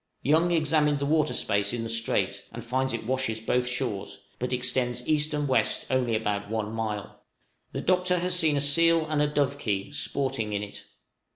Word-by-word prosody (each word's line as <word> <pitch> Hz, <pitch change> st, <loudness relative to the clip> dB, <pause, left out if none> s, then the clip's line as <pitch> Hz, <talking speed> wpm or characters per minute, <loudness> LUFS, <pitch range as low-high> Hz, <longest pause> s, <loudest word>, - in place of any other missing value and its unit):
Young 160 Hz, +5 st, +3 dB
examined 155 Hz, -3 st, +2 dB
the 140 Hz, -, -2 dB
water 150 Hz, -4 st, +2 dB
space 100 Hz, -1 st, 0 dB
in 120 Hz, -1 st, -2 dB
the -, -, -3 dB
strait, 100 Hz, -3 st, 0 dB
and 115 Hz, +1 st, -8 dB
finds 130 Hz, +2 st, 0 dB
it 115 Hz, -1 st, -4 dB
washes 130 Hz, -3 st, -1 dB
both 125 Hz, +3 st, 0 dB
shores, 120 Hz, -6 st, -3 dB, 0.2 s
but 125 Hz, +1 st, -2 dB
extends 125 Hz, -1 st, -1 dB
east 155 Hz, 0 st, +2 dB
and 150 Hz, -1 st, -1 dB
west 130 Hz, -, +1 dB
only 125 Hz, -3 st, +1 dB
about 105 Hz, -2 st, -2 dB
one 110 Hz, -1 st, -2 dB
mile. 110 Hz, -2 st, -4 dB, 0.5 s
The -, -, -4 dB
Doctor 180 Hz, 0 st, +2 dB
has 180 Hz, +1 st, 0 dB
seen 160 Hz, -5 st, +3 dB
a -, -, +1 dB
seal 165 Hz, +3 st, +4 dB
and 155 Hz, -1 st, 0 dB
a 150 Hz, -, +3 dB
dovekie 140 Hz, -5 st, -1 dB
sporting 130 Hz, -7 st, -1 dB
in 100 Hz, 0 st, -1 dB
it. 100 Hz, -, -8 dB
130 Hz, 185 wpm, -27 LUFS, 110-150 Hz, 0.5 s, seal